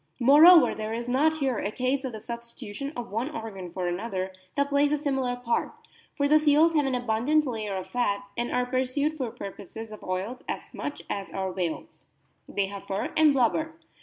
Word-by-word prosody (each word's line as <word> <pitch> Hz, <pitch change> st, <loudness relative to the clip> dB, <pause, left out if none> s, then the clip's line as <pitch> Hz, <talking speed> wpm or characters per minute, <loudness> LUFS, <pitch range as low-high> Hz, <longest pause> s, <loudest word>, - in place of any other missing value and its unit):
Moreover, 295 Hz, +3 st, +8 dB
there 215 Hz, 0 st, -4 dB
is 235 Hz, +1 st, -4 dB
not 295 Hz, +6 st, +3 dB
here 265 Hz, -6 st, 0 dB
a -, -, -2 dB
case 255 Hz, +5 st, -1 dB
of 260 Hz, -, -3 dB
the 215 Hz, -, -7 dB
substitu 235 Hz, -2 st, -8 dB
tion 275 Hz, +6 st, -4 dB
of 240 Hz, -4 st, -5 dB
one 230 Hz, +7 st, -1 dB
organ 195 Hz, -, -7 dB
for 185 Hz, 0 st, -3 dB
another 185 Hz, +1 st, -3 dB, 0.2 s
that 280 Hz, 0 st, +1 dB
plays 285 Hz, +1 st, +3 dB
a 300 Hz, -, +2 dB
similar 270 Hz, -4 st, -1 dB
part; 245 Hz, -1 st, -1 dB, 0.4 s
for 285 Hz, -1 st, +2 dB
the 305 Hz, +1 st, +6 dB
seals 305 Hz, +2 st, +4 dB
have 295 Hz, -3 st, +2 dB
an 260 Hz, -, 0 dB
abundant 245 Hz, +6 st, +1 dB
layer 215 Hz, -6 st, -3 dB
of 185 Hz, -1 st, -4 dB
fat, 200 Hz, -5 st, -1 dB
and 240 Hz, 0 st, -2 dB
are 250 Hz, 0 st, +1 dB
pursued 260 Hz, +4 st, 0 dB
for 260 Hz, -6 st, -3 dB
purposes 215 Hz, +2 st, -8 dB
of 215 Hz, -, -10 dB
oil 190 Hz, +7 st, -3 dB
as -, -, -5 dB
much 290 Hz, -, -5 dB
as 195 Hz, -3 st, -4 dB
are 190 Hz, -1 st, -2 dB
whales. 180 Hz, -3 st, -5 dB, 0.4 s
They 200 Hz, -, 0 dB
have 200 Hz, 0 st, -8 dB
fur 195 Hz, -, -2 dB
and 315 Hz, -1 st, +6 dB
blubber. 280 Hz, +5 st, +1 dB
245 Hz, 200 wpm, -27 LUFS, 205-280 Hz, 0.4 s, Moreover